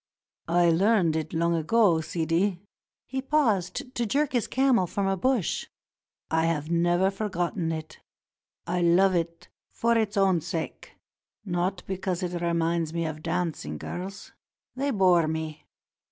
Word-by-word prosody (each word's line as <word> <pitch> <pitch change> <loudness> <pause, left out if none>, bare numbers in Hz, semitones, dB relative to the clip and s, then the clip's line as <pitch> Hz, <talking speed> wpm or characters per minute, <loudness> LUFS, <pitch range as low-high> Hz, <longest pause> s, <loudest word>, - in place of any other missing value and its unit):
"I 170 0 +4
learned 185 -2 +3
it 160 -1 -2
long 170 +1 +1
ago, 170 +1 +3
Sidi," 170 +4 0 0.3
— - - -68
he 265 0 -3
paused 250 - 0
to 240 - -1
jerk 285 +6 +1
his 240 -3 +1
camel 260 -8 +2
from 200 +3 -2
a 195 0 +1
bush; 245 -1 0 0.6
"I 160 0 +2
have 155 -1 -1
never 175 +3 +2
forgotten 180 -4 -2
it. 155 -1 -6 0.7
I 175 +1 -1
love 180 +3 +4
it 170 -1 -2 0.2
for 235 0 +1
its 215 -2 0
own 190 -4 +3
sake, 165 0 -5 0.5
not 180 0 -1
because 185 -1 -3
it 175 -1 -3
reminds 170 -1 0
me 170 -1 -1
of 155 -1 -5
dancing 165 - -2
girls. 190 - -7 0.4
They 275 +2 -1
bore 180 - +4
me. 155 -1 -4
175 Hz, 145 wpm, -27 LUFS, 165-195 Hz, 0.7 s, I